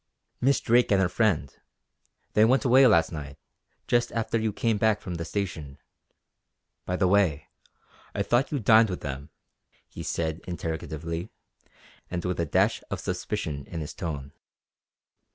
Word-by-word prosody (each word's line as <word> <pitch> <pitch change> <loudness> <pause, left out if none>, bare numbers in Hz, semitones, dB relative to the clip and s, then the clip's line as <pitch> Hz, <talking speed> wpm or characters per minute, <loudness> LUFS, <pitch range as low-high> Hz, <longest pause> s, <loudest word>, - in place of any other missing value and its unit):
"Miss 135 +2 +3
Drake 120 0 +3
and 100 - +4
her 95 - +3
friend. 95 - 0 0.8
They 105 - +5
went 130 +5 +3
away 130 +1 +7
last 85 -8 +4
night, 75 -3 -7 0.5
just 120 0 +2
after 115 0 0
you 110 -1 0
came 110 0 0
back 110 -1 +3
from 90 - -6
the 85 -1 -4
station. 80 -7 -4 1.1
By 90 - 0
the 95 0 +2
way, 90 -7 +2 0.7
I - - 0
thought 120 +4 +1
you 145 - 0
dined 110 -1 +5
with 90 - -4
them?" 70 0 -6 0.6
he - - -9
said 80 0 -2
interrogatively, 80 +1 -4 0.8
and 85 -1 -4
with 90 -1 -2
a 85 - 0
dash - - +2
of - - -3
suspicion 70 -3 -4
in 85 - -6
his 75 - -6
tone. 70 -5 -5
90 Hz, 155 wpm, -27 LUFS, 80-110 Hz, 1.1 s, away